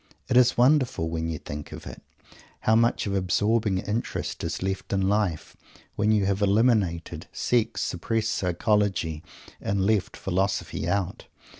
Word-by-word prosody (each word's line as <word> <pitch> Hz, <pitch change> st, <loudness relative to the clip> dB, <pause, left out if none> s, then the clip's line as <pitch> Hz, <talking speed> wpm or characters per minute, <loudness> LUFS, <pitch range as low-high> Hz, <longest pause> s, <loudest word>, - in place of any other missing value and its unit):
It 125 Hz, -, +1 dB
is 125 Hz, 0 st, +5 dB
wonderful 125 Hz, -, +3 dB
when 80 Hz, 0 st, -2 dB
you 80 Hz, -1 st, -3 dB
think 75 Hz, 0 st, -8 dB
of -, -, -9 dB
it -, -, -9 dB, 0.6 s
how 110 Hz, -, +3 dB
much 115 Hz, +1 st, +2 dB
of 100 Hz, -, -2 dB
absorbing 105 Hz, +2 st, +1 dB
interest 105 Hz, +5 st, -3 dB
is -, -, -3 dB
left 95 Hz, 0 st, -3 dB
in 95 Hz, -1 st, +1 dB
life, 100 Hz, -6 st, -1 dB, 0.4 s
when 105 Hz, +1 st, +2 dB
you 105 Hz, -2 st, +3 dB
have 100 Hz, +1 st, 0 dB
eliminated 95 Hz, -6 st, +1 dB
"sex," 115 Hz, +1 st, 0 dB
suppressed 110 Hz, +5 st, -1 dB
"psychology," 90 Hz, -3 st, 0 dB, 0.4 s
and 100 Hz, -1 st, 0 dB
left 105 Hz, -2 st, +1 dB
philosophy 95 Hz, +2 st, -1 dB
out! 95 Hz, -2 st, -1 dB
100 Hz, 145 wpm, -26 LUFS, 90-110 Hz, 0.6 s, is